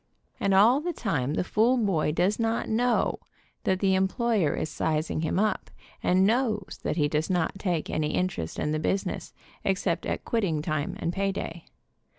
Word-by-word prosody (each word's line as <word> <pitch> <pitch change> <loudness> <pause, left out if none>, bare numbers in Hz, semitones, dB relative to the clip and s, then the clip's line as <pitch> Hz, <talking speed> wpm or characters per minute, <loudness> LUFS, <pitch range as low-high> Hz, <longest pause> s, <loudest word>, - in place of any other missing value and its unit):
And 195 -1 +2
all 235 +8 +6
the 350 +2 -2
time 145 - -1
the - - +1
fool 230 +7 +3
boy 190 -10 +1
does 185 +7 +1
not 225 0 0
know 240 +2 +1 0.5
that 190 0 +1
the 195 -1 +3
em 190 0 +3
ployer 225 - +1
is - - -1
sizing 155 0 -1
him 160 - -1
up, 215 +2 0 0.3
and 185 +1 +3
knows 220 -3 0
that - - -2
he 150 -2 +3
does 150 +1 -1
not 180 +1 0
take 175 -6 -1
any 150 -1 -1
interest 180 - -2
in 150 - -1
the 155 - 0
business, 190 +5 -2 0.3
except 185 -3 0
at - - -3
quitting 180 -10 0
time 155 -2 -2
and 170 - -1
pay 195 +1 0
day. 170 -3 -6
190 Hz, 180 wpm, -27 LUFS, 160-215 Hz, 0.5 s, all